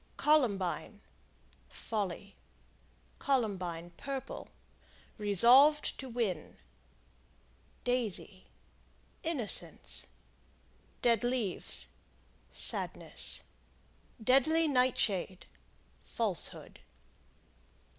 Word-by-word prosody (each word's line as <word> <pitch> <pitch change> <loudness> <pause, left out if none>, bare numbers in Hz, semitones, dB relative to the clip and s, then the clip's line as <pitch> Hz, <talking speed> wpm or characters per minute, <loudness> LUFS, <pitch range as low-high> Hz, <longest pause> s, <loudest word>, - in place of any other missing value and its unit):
Columbine 210 - +1 0.7
Folly. 200 -2 -5 0.8
Columbine, 185 -10 -2
Purple 275 -1 -6 0.7
Resolved 245 - +6
to 265 - -7
win. 220 -9 -3 1.3
Daisy 220 -6 -1 0.8
Innocence. 295 -10 -1 1.0
Dead 235 -2 +3
Leaves 240 -6 0 0.6
Sadness. - - 0 0.8
Deadly 315 +7 +3
Nightshade 240 - 0 0.6
Falsehood. - - -4
235 Hz, 50 wpm, -32 LUFS, 195-265 Hz, 1.3 s, Resolved